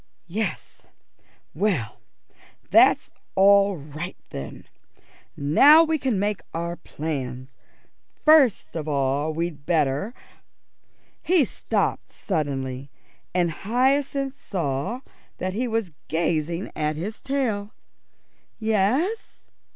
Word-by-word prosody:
"Yes, 185 0 -4 0.7
well, 160 - -1 0.7
that's - - +5 0.2
all 200 0 +5
right 155 +5 -7
then. 70 - -7 0.7
Now 275 - +7
we 320 -1 0
can 255 -6 0
make 205 -2 -1
our 170 +1 -2
plans. 135 -6 -5 0.7
First 305 - +5
of 155 -2 -4
all 140 +1 0
we'd 160 -2 -3
better 155 - +1 0.5
" - - -40
He 345 -7 +5
stopped - - -2
suddenly, 140 -6 -3 0.5
and 175 -2 +2
Hyacinth 270 - 0
saw 165 - -2 0.4
that 185 0 -3
he 245 +5 -1
was 225 -6 -1 0.2
gazing 165 +2 -1
at 150 0 -1
his 200 +8 -5
tail. 225 -7 -1 0.9
"Yes?" 225 - 0
180 Hz, 95 wpm, -24 LUFS, 150-225 Hz, 0.9 s, Now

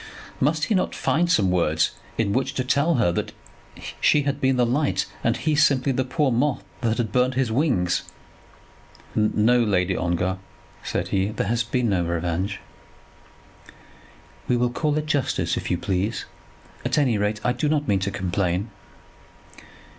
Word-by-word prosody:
Must 150 +2 +1
he - - 0
not 185 - 0
find 170 +2 +1
some 100 - +3
words 80 -3 +2 0.3
in 105 -3 +1
which 135 +1 -1
to 130 - 0
tell 140 +6 +2
her 110 -8 +2
that 85 - -3 0.7
she 150 - +4
had 140 0 -2
been 130 0 +3
the 125 - +3
light, 140 +5 0 0.2
and 115 +1 +1
he 150 +6 0
simply 140 -3 +3
the 130 0 0
poor 135 +2 0
moth 125 +3 0 0.2
that 115 -2 0
had 115 -4 -1
burned 125 +2 +2
his 130 -3 0
wings? 105 - +1 1.1
"No, 110 +3 +3
Lady 95 -3 +1
Ongar," 90 +2 -1 0.4
said - - -2
he, 95 0 +1
"there 105 0 -2
has 120 +3 0
been 120 0 0
no 90 -3 +1
revenge." 85 +4 -2 1.9
"We 125 - +2
will 120 0 +1
call 150 +3 0
it 155 - -1
justice, 145 -4 0
if - - -4
you - - +1
please. 95 +5 -2 0.6
At - - 0
any 125 -8 +2
rate 105 +1 0
I 125 - +2
do 135 +4 -1
not 150 -2 0
mean 100 -2 +2
to 95 +1 -1
complain." 95 +2 -1
120 Hz, 165 wpm, -24 LUFS, 95-135 Hz, 1.9 s, she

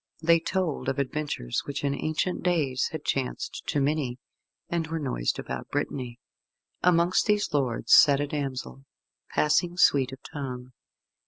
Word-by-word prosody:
They 165 +1 +4
told 175 -2 -1
of 135 - -2
adventures 140 - -2
which 140 - -4
in 140 -1 +1
ancient 155 +5 -1
days 150 -8 +1
had 155 -2 -6
chanced 130 -2 -2
to 145 - 0
many, 140 -3 0 0.5
and 170 -2 -1
were 165 +1 -3
noised 130 - -1
about - - -6
Brittany. 125 -3 -3 0.6
Amongst 175 +2 +3
these 210 -5 +1
lords 130 -5 +1
sat 140 -3 +8
a 145 - +1
damsel, 130 - -5 0.4
passing 170 +4 +1
sweet 135 -7 +4
of 135 - -8 0.2
tongue. 130 -4 -6
145 Hz, 145 wpm, -27 LUFS, 130-165 Hz, 0.6 s, sat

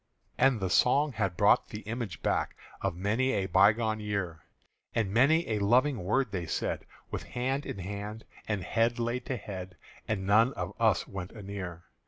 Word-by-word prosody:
And 130 -3 +3
the 95 -2 -2
song 140 +8 +4
had 95 -5 -1
brought - - +4
the 105 - -7
image 110 -4 -5
back - - 0 0.3
Of 95 -3 -1
many 110 +9 +1
a 95 - 0
bygone 105 +4 +3
year; 100 -7 -3 0.5
And 105 -4 +1
many 155 +8 +4
a 110 -2 0
loving 120 +3 +3
word 125 +5 +1
they 90 -4 -3
said - - -2 0.2
With - - -3
hand 130 +3 -2
in - - -5
hand 100 +3 -6 0.2
and 105 -4 -1
head 115 +4 +1
laid 120 +1 -2
to 130 - -1
head; 95 -3 -7 0.3
And 100 -3 -1
none 110 +6 +4
of 90 +2 -4
us 110 -6 +3
went 95 -1 -6
anear. 95 -5 -6
105 Hz, 175 wpm, -30 LUFS, 95-120 Hz, 0.5 s, song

